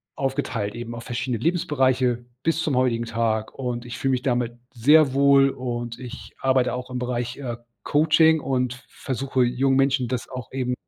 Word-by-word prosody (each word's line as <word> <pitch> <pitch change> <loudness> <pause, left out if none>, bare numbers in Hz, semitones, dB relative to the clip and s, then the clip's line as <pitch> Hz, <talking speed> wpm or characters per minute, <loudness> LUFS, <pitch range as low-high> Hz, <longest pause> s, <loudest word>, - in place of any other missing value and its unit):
aufgeteilt, 130 -6 -2
eben 120 0 -6
auf 115 - -7
verschiedene 120 -1 -3
Lebensbereiche 130 -7 +1 0.2
bis 165 0 +1
zum 150 -5 0
heutigen 120 -2 +1
Tag. 115 -1 -1
Und, 125 -2 -4
ich 120 -2 -7
fühle 135 - 0
mich 125 -1 0
damit 120 -3 0 0.2
sehr 140 +4 +5
wohl 140 0 +5
und 120 -2 -5
ich 125 0 -9
arbeite 130 -2 +2
auch 125 0 -5
im 125 -1 -4
Bereich, 120 0 -3
äh, 120 -4 -5 0.3
Coaching 160 +1 +4
und 125 -3 -1
v 130 - -16
versuche 130 0 -1
jungen 130 +2 +1
Menschen 135 -2 +2
das 125 -1 -4
auch 130 -2 -7
eben 125 -1 -1
125 Hz, 175 wpm, -24 LUFS, 120-135 Hz, 0.3 s, sehr